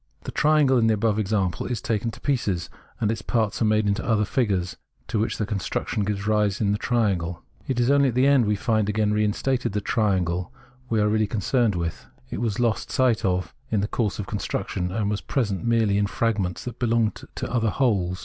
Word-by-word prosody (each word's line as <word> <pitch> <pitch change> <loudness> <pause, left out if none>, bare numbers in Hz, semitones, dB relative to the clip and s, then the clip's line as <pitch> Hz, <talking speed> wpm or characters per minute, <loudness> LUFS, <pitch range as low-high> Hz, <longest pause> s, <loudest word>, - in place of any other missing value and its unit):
The - - -5
triangle 150 -4 +4
in 115 - +3
the 110 - +3
above 110 0 +1
example 100 -4 0
is 120 -3 -2
taken 115 +1 -1
to - - -10
pieces, 100 - -1 0.3
and 110 -1 +1
its 110 -1 -3
parts 110 -2 -1
made 110 -1 +3
into 100 +2 0
other 110 -3 +2
figures 100 -7 0 0.3
to 110 - 0
which 110 - -1
the 105 - -1
construction 105 0 -2
gives 100 -1 -2
rise 105 -2 +1
in 100 -2 +1
the 105 - 0
triangle. 95 -8 0 0.2
It 130 -3 -1
is 120 +2 +3
only 140 -1 +4
at 120 - -4
the 130 +1 +4
end 140 -4 +5
that - - -2
we 105 - +2
find 110 -1 0
again 105 0 +1
reinstated 105 +3 0
the 105 - 0
triangle 95 -5 0 0.4
we 110 - +1
are 105 - +3
really 110 0 +2
concerned 110 +1 +1
with; 85 -2 -4 0.2
it - - -3
was 110 -3 -1
lost 115 -2 0
sight 130 -5 +2
of 90 -1 0 0.2
in 105 -3 +1
the 105 - -1
course 110 -2 -1
of 105 - -4
the - - -11
construction, 90 -3 -2
and 105 +1 -1
was 105 0 -1
present 105 -9 -1
merely 110 -4 +2
in 100 - +2
fragments, 105 -5 -1
that 120 -2 -7
belonged 115 -2 +1
to - - -4
other 115 -2 +2
wholes. 95 -6 0
105 Hz, 215 wpm, -24 LUFS, 100-115 Hz, 0.4 s, end